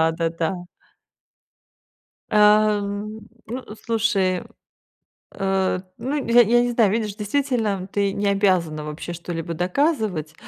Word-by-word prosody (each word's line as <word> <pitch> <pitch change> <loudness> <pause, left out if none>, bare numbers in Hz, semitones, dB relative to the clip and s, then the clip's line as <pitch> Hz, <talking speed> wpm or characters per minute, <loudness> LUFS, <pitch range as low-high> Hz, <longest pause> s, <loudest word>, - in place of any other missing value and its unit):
Да, 160 0 +4
да-да. 165 +1 -1 1.8
А, 210 0 +5
м, 205 +2 -5 0.3
ну 250 +3 -6 0.2
слушай, 205 -5 +1 1.0
э, 190 -1 0 0.2
ну, 270 +4 -2
я 235 +1 +7
я 240 +1 +4
не 245 0 0
знаю, 230 -4 +3
видишь, 215 -2 -1
действительно 215 -4 -1
ты 200 -1 +1
не 205 +1 -1
обязана 185 -6 +1
вообще 150 +3 -6
что-либо 170 -1 -5
доказывать. 180 - 0
205 Hz, 115 wpm, -22 LUFS, 180-225 Hz, 1.8 s, я